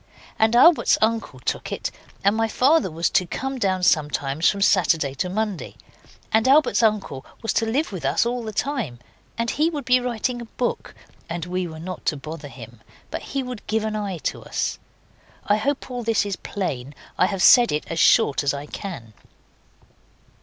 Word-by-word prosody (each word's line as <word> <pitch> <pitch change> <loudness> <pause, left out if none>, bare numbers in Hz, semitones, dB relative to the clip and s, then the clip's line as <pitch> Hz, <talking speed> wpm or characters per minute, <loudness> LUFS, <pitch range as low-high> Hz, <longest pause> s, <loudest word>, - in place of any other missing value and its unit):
And 220 +1 +3
Albert's 330 +7 +6
uncle 220 - -1
took - - -3
it, - - -3 0.3
and 200 +2 +3
my 225 0 +1
father 275 +3 +3
was 165 +1 -1
to 180 -3 +2
come 265 +7 -4
down 190 -4 0
sometimes 150 -2 +2
from 200 -1 0
Saturday 165 -8 +3
to 180 +7 -2
Monday, 210 -1 -3 0.6
and 220 +2 +3
Albert's 285 -1 +4
uncle 210 - 0 0.2
was 225 - 0
to 225 - +1
live 270 +6 0
with 185 -6 -6
us 135 - +2
all 245 +1 -1
the 220 - -5
time, 230 - -2 0.4
and 230 0 0
he 310 +3 +2
would 295 -5 -5
be 255 -1 +4
writing 245 0 -2
a - - -7
book, 240 +2 -4 0.3
and 170 -1 -4
we 180 0 -2
were 160 -1 -9
not 180 +2 -7
to 150 - +1
bother 155 +1 -8
him, 120 -4 -12 0.3
but - - -4
he 275 -1 -3
would 250 -4 -8
give 220 0 0
an 215 0 -2
eye 200 -4 -3
to - - -2
us. - - -3 0.7
I 205 - +3
hope 270 +3 -2
all 245 -1 -3
this 225 -2 +1
is 200 -2 -2
plain. 140 -10 -5 0.2
I 180 - +5
have 195 -2 -2
said 245 -2 +7
it 150 - -1
as 165 - -4
short 140 - +4
as 140 0 +1
I 140 +1 -6
can. 150 - -8
205 Hz, 190 wpm, -23 LUFS, 160-240 Hz, 0.7 s, said